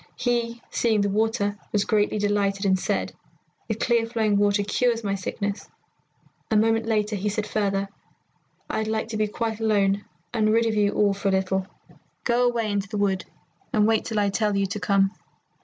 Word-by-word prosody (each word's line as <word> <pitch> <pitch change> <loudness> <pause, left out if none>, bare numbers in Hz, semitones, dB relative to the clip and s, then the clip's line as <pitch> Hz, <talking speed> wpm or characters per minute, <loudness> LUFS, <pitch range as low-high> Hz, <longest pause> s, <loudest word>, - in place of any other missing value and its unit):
He, 235 -1 -1
seeing 220 -3 +2
the 200 - +1
water, 205 -1 0
was 205 -1 +1
greatly 210 0 +1
delighted, 205 -1 0
and 190 -1 +3
said, - - -1 0.5
'The 220 - -1
clear 230 +1 +1
flowing 220 -3 +1
water 205 0 +3
cures 230 +3 +1
my 200 -1 -1
sickness.' 200 +1 -4 0.8
A 220 - +1
moment 225 +1 +2
later 215 -1 +1
he 205 +1 -1
said 210 +1 -2
further, 200 -2 0 0.8
'I'd 220 - -2
like 220 0 -2
to 220 - -3
be 215 0 +1
quite 225 +1 -3
alone 205 -2 +2 0.3
and 215 -1 +2
rid 230 +1 +3
of 225 - +1
you 205 -1 +2
all 205 -1 +3
for 200 +1 -3
a - - +3
little. 190 0 0 0.6
Go 245 0 +3
away 230 -3 0
into 200 -1 -2
the 210 - -3
wood 195 -2 0 0.5
and 215 -5 +3
wait 220 0 +2
till 220 - -3
I 200 -1 +2
tell 210 0 +1
you 200 - +2
to 205 +2 -4
come.' 195 +1 +2
210 Hz, 190 wpm, -25 LUFS, 200-225 Hz, 0.8 s, and